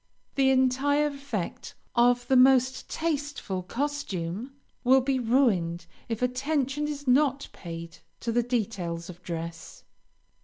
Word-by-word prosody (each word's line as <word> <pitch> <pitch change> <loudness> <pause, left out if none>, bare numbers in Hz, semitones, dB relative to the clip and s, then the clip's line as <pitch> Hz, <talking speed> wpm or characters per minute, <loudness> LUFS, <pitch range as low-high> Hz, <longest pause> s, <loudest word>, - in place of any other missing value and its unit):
The 270 -1 +3
entire 265 +3 +3
effect 275 -10 -5 0.2
of 245 0 +3
the 265 - +3
most 260 0 +4
tasteful 290 - -2
costume 235 - -3 0.3
will 260 +1 +6
be 265 0 0
ruined 205 -10 +2 0.2
if 225 +1 -2
attention 275 +3 0
is 290 -2 -5
not 275 +2 +3
paid 165 -1 -8 0.2
to 235 - -1
the 240 +1 +3
details 195 -8 -2
of 175 0 -16
dress. 165 -1 -6
250 Hz, 120 wpm, -27 LUFS, 190-275 Hz, 0.3 s, will